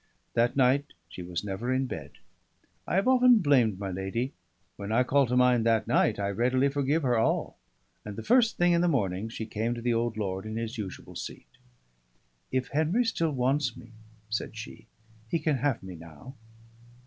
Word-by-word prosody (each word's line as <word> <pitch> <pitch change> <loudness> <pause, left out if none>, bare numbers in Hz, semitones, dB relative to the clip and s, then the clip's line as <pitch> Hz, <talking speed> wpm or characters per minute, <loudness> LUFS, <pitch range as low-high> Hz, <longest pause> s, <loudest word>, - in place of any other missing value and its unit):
That 120 +1 +2
night 135 +2 +2 0.2
she 90 - -8
was 90 0 -4
never 105 +5 -3
in 130 +1 +1
bed; 75 - -7 0.7
I - - -1
have 195 +6 +2
often 250 -2 +6
blamed 130 - +3
my 100 -1 -4
lady 95 +8 -3 0.4
when 100 +1 -6
I 120 +3 +4
call 135 +1 +3
to 125 +1 0
mind 125 -2 +4
that 115 -1 +2
night - - +2
I 100 -1 -1
readily 125 +6 +2
forgive 145 +3 0
her 120 -3 +2
all; 115 - 0 0.4
and 105 -1 -7
the 110 - -6
first 240 -2 +3
thing 175 0 +4
in 170 0 +3
the 175 - +3
morning 105 - 0
she 110 0 -5
came 110 +2 -2
to 120 - -6
the 120 -1 +2
old 115 -1 -1
lord 95 -1 -3
in 110 - -5
his 115 +1 -3
usual 100 -6 -7
seat. - - -7 1.1
"If 130 -1 -1
Henry 160 +11 +1
still 165 -7 0
wants 130 -1 0
me," 120 -1 -13 0.4
said 110 0 -4
she, 110 +1 -9 0.4
"he 170 - +1
can 155 -3 0
have 135 -4 -1
me 95 -1 -8
now." 85 - -12
120 Hz, 190 wpm, -28 LUFS, 110-140 Hz, 1.1 s, often